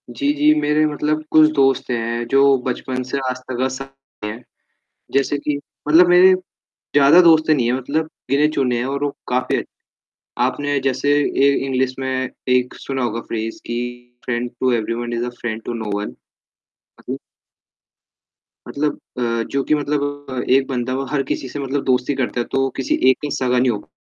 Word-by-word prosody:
जी, 130 +4 0
जी, 150 +1 +4
मेरे 150 +1 +2 0.5
कुछ 155 0 +7
दोस्त 135 -2 +2
हैं 115 0 -2
जो 135 +2 +5
बचपन 130 0 -3
से 140 - -1
आज 130 - -3
तक 130 +1 0
साथ 135 +1 -7 0.4
में 105 - -3
हैं। 115 +3 -10 0.7
जैसे 140 +1 +1
कि 145 0 -2 0.3
मतलब 165 +4 +7
मेरे 180 +1 +7 0.6
ज़्यादा 145 +4 +7
दोस्त 160 -2 +5
नहीं 135 -6 +3
हैं, 120 - +2
मतलब 155 +5 -2 0.2
गिने-चुने 140 -3 +2
हैं 120 - -1
और 140 +2 -2
वो 145 - 0 0.2
काफ़ी 125 0 0
अच्छे - - 0 0.8
हैं। 125 - +3
आपने 145 +2 -1
जैसे 135 +1 0 0.4
ए - - +5
इंग्लिश 130 -1 0
में 130 -1 -2 0.2
एक 125 0 +2
सुना 135 -2 -3
होगा 115 -1 -2
फ्रेज़ 115 -1 -5
कि 120 - -3 0.5
"friend 120 0 -2
to 130 - +2
everyone 120 +1 -2
is 120 +1 -1
a - - -3
friend 115 -1 -3
to - - -3
know 105 - -5
one" 105 - -4 0.9
हाँ - - -18
जी। - - -2 1.5
मतलब 145 0 -2 0.2
अ, 115 -2 0
जो 140 0 0
कि 155 - +2
मतलब 145 0 -1 0.3
अ, 130 -1 -3
एक 135 0 +3
बंदा 130 -1 -2 0.2
हर 145 -2 +1
किसी 130 - -2
से 145 - -6 0.2
दोस्ती 130 +1 +1
करता 125 -2 -1
तो 135 - +1
वो 135 - +1
किसी 135 - 0
एक 130 - +4
से 145 - -4
सगा 125 -1 +1
नहीं 125 0 +3
होगा। 105 -2 -6
130 Hz, 180 wpm, -20 LUFS, 125-145 Hz, 1.5 s, कुछ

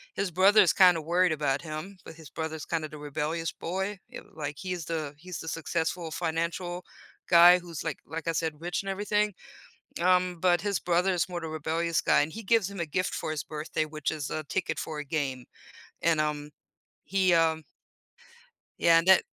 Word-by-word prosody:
his 195 -1 -1
brother's 195 +2 +5
kinda 180 -4 +6
worried 175 +2 +2
about 145 -2 0
him, 160 +5 -7
but - - -10
his 160 -2 -13
brother's 160 -1 -5
kinda 160 -2 -2
the 155 - -9
rebellious 150 +3 -3
boy, 190 +4 -3
ye - - -8
like, 145 -2 -5
he's 180 -4 -4
the 155 -3 -3
he's 180 +3 -7
the 160 - -8
successful 165 +1 -2
financial 170 +3 -2 0.4
guy 175 +1 +8
who's 170 -3 -7
like 160 -3 -3
like, 165 +2 -6
I 165 - +3
said, 160 -2 -2
rich 175 +2 -2
and 195 - -5
everything. 210 +1 0 0.7
Um, 180 -1 +2
but 175 -2 +3
his 200 -2 0
brother 180 +2 +2
is 180 +1 0
more 175 -1 -4
the 165 - -5
rebellious 160 +1 -1
guy, - - +3
and 155 +2 -3
he 225 - -7
gives 205 -1 +2
him 195 - -7
a 170 - -1
gift 185 +4 -1
for - - -3
his 155 -4 -3
birthday 155 0 -3
which 155 -1 -3
is 150 -3 -4
a 155 - -3
ticket 180 +5 -2
for 155 -1 -4
a 150 - -5
game, 135 -4 -2 0.6
and, 165 -2 +3
um, 150 -1 -2 0.6
he, 190 -2 +2
um 160 -1 +3 1.2
Yeah, 165 -1 +6
and 165 - 0
that 190 - +7
165 Hz, 190 wpm, -28 LUFS, 155-180 Hz, 1.2 s, guy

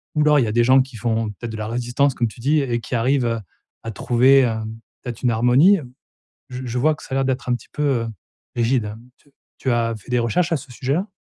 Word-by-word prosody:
Ou 150 - +2
alors 150 0 +5
il - - +3
y - - -1
a - - -1
des 120 +2 +3
gens 130 +2 +6
qui 130 -2 -7
font 115 -1 -1
peut-être 115 +3 -7
«de - - -6
la 110 0 -4
résistance» 120 +4 0
comme 120 - +1
tu 110 - -12
dis 150 +5 +2
et 120 -3 -1
qui 115 - -8
arrivent, 130 +3 +2
heu, 115 -1 -1 0.4
à 115 - -5
trouver, 125 +5 +4
hem, 110 -2 -2 0.2
peut-être 120 -2 -7
une 125 - +3
harmonie? 125 - +5 0.7
Je 125 0 -6
je 120 0 -4
vois 155 +5 +3
que - - -15
ça - - -13
a - - 0
l'air 135 0 +1
d'être 130 0 -2
un 125 - +2
petit 120 - -8
peu, 150 - -3
heu, 125 -5 +1 0.5
rigide. 115 -3 0 0.3
T 145 - -28 0.3
tu 130 - -1
as 115 -1 0
fait 110 - -14
des 125 - +2
recherches 165 +9 0
à - - +3
ce 135 0 -13
sujet-là? 140 - -1
125 Hz, 255 wpm, -21 LUFS, 115-135 Hz, 0.7 s, gens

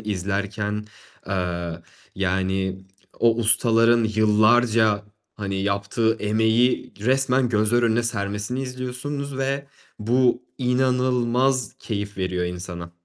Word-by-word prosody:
izlerken, 105 +1 -3 0.4
eee, 85 -3 -3 0.4
yani 95 0 -1 0.4
o 115 -1 +4
ustaların 115 0 +4
yıllarca, 110 0 +3 0.3
hani, 100 -2 -3
yaptığı 100 +3 0
emeği 110 +4 +1
resmen 130 +2 +2
gözler 110 +2 +2
önüne 115 0 +2
sermesini 105 +2 -3
izliyorsunuz 130 +2 -5
ve 140 +1 -1 0.3
bu 125 +3 +2 0.2
inanılmaz 125 -1 +1
keyif 105 -2 -5
veriyor 90 -1 -1
insana. 90 -1 -6
110 Hz, 90 wpm, -23 LUFS, 100-125 Hz, 0.4 s, o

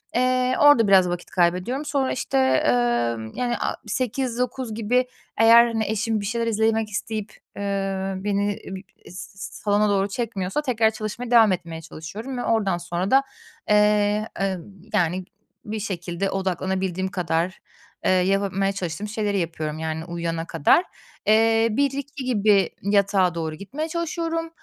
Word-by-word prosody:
Eee, 255 0 +2
orada 290 -7 +6
biraz 190 -2 +5
vakit 175 0 -5
kaybediyorum. 185 - 0
Sonra, 280 -2 0
işte, 135 - -2
eee, 130 -2 +3 0.6
yani 245 -1 -1
a - - -1
20.00-21.00 250 -1 -2
gibi 245 +3 +1 0.3
eğer, 230 +1 +7
hani, 225 -2 -1
eşim 220 +1 0
bir - - -5
şeyler 230 +2 -1
izlemek 220 0 +1
isteyip, 215 +1 -4 0.2
eee, 195 -1 -2
beni 205 +1 -1 0.2
b 190 - -6 0.3
s 190 +1 -10 0.3
salona 205 0 +2
doğru 195 0 +2
çekmiyorsa 205 +2 -2
tekrar 230 -5 +2
çalışmaya 220 +3 -5
devam 225 -4 +6
etmeye 170 -2 -4
çalışıyorum 205 - -7
ve 245 - -3
oradan 200 -6 +1
sonra 175 +2 -3
da, 270 +1 +5 0.5
eee, 210 0 +3
emm, 190 -3 -1 0.3
yani, 180 -1 +1 0.4
bir 215 +1 -4
şekilde 190 -1 -3
odaklanabildiğim 190 0 -2
kadar, 175 0 -1 0.5
eee, - - +4
yapabilmeye 195 +1 +1
çalıştığım 190 +1 -4
şeyleri 210 -2 -1
yapıyorum 160 -2 -3
yani 160 0 -3
uyuyana 170 -1 -3
kadar. 165 - +3 0.4
Eee, 225 +1 +4
01.00-02.00 280 +2 -2
gibi 210 -5 +3
yatağa 200 -3 +2
doğru 160 -2 -3
gitmeye 275 - -5
çalışıyorum. 330 0 -2
205 Hz, 140 wpm, -23 LUFS, 185-230 Hz, 0.6 s, eğer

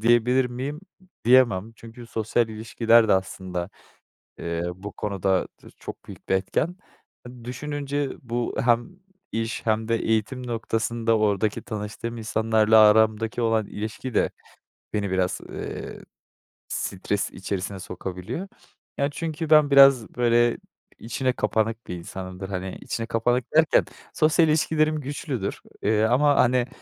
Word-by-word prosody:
diyebilir 120 +3 +4
miyim? 130 +5 -5 0.2
M 185 - -23 0.2
diyemem. 115 -4 +4
Çünkü 115 +1 -12
sosyal 115 +1 0
ilişkiler 115 +1 +3
de - - +5
aslında, 95 -1 -2 0.7
eee, 85 0 -3
bu 100 +2 -8
konuda 95 -2 0 0.2
dır - - -14
çok - - -9
büyük - - -12
bir 95 - +2
etken. 150 - -1 0.7
Düşününce 145 +2 -3
bu 120 -1 -3
hem 120 +4 +2 0.4
iş 115 +1 -3
hem 110 0 +1
de 115 - +2
eğitim 115 +3 -1
noktasında 115 0 0
oradaki 105 0 +1
tanıştığım 110 +1 -5
insanlarla 110 0 +3
aramdaki 110 +2 +4
olan 115 -2 +1
ilişki 110 +5 -6
de - - +2 0.6
beni 100 -2 -1
biraz, 95 -1 0
eee, - - -6 0.7
stres 100 +2 -2
içerisine 95 0 -4
sokabiliyor. 95 - -6 0.5
Yani, 140 +1 0
çünkü 160 -1 -4
ben 150 -2 +6
biraz, 135 -4 +7
böyle, 120 -1 +3 0.4
içine 125 +3 -1
kapanık 115 +1 -1
bir 90 - -4
insanımdır. 95 +2 -7
Hani, 95 -1 -4
içine 115 - -3
kapanık 120 +2 0
derken 160 -1 +5 0.3
sosyal 160 +1 +4
ilişkilerim 155 0 +2
güçlüdür. 135 -6 -4 0.2
Eee, 105 +1 +2
ama, 135 +6 +4
hani, 125 -1 +3
115 Hz, 130 wpm, -25 LUFS, 105-125 Hz, 0.7 s, biraz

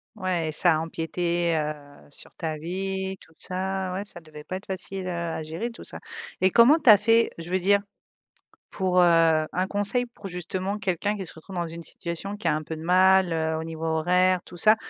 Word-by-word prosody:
Ouais, 180 -5 -1
et - - -2
ça 160 +1 +3
empiétait, 170 +1 -1
heu, 150 -2 -6
sur 145 - -9
ta 160 -2 -3
vie, 190 +3 -3
tout 160 - -16
ça. 190 0 -3
Ouais, 190 +2 -3
ça 195 - -10
devait 155 -2 -12
pas 185 - -5
être 195 - -12
facile, 190 0 -5
heu, - - -2
à 170 -2 -3
gérer 165 +10 -4
tout 230 - -10
ça, - - -6 0.4
et 185 - +5
comment 240 - +6
tu 290 - +4
as 210 - +10
fait, 225 +3 +3
je 165 +1 -8
veux 185 - +2
dire, 200 +2 +4 0.9
pour, 185 -2 +1
heu, 165 -2 +5
un 185 +1 0
conseil 205 +5 +1
pour 225 -4 -10
justement 185 +2 -3
quelqu'un 205 +1 -1
qui 195 -2 -5
se 160 - -7
retrouve 170 +4 -11
dans 175 -1 -1
une 165 +1 -8
situation 170 +5 -5
qui 210 - -4
a - - +2
un 155 - -3
peu 160 - -6
de 155 - -9
mal, 185 +1 +4
heu, 160 -1 0
au - - -4
niveau 160 0 -6
horaire, 180 +3 +2
tout 175 - -11
ça? 215 +5 +6
180 Hz, 220 wpm, -26 LUFS, 165-190 Hz, 0.9 s, as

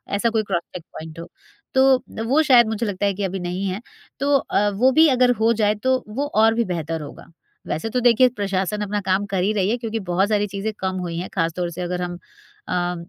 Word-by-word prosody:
ऐसा 230 +3 +1
कोई 220 -1 0
cross 185 -4 -1
check 175 - -6
point 160 +1 -9
हो। 170 - -8 0.5
तो 265 0 +5 0.3
अ, - - -1
वो 265 +7 +2
शायद 250 -6 +6
मुझे 220 +1 -2
लगता 205 -1 -2
है 200 - +1
कि 200 +1 -4
अभी 190 0 -2
नहीं 180 +2 -3
है 190 +3 -3 0.4
तो 280 +1 +2
अ, 205 -5 0
वो 230 +6 +3
भी 315 +4 +6
अगर 250 -1 +4
हो 225 +1 +4
जाए 210 -1 +1
तो 260 0 +2
वो 260 +7 -3
और 220 +1 +5
भी 235 +1 +1
बेहतर 165 -1 -3
होगा। 145 - -10 0.4
वैसे 160 +9 -3
तो 250 +3 0
देखिए 245 +1 +5
प्रशासन 195 0 -1
अपना 205 0 -2
काम 190 +1 0
कर 195 -2 -1
ही 200 - +2
रही 195 -2 +1
है 235 - +1
क्योंकि 225 -2 -4
बहुत 190 +4 +2
सारी 210 -1 +1
चीज़ें 200 +2 -3
कम 190 0 -2
हुई 170 -2 -4
हैं 180 - -4
खास 165 0 0
तौर 175 -1 -1
से 175 - -6
अगर 180 0 -3
हम 175 0 -3 0.5
अ, 180 0 -1
205 Hz, 245 wpm, -22 LUFS, 180-230 Hz, 0.5 s, शायद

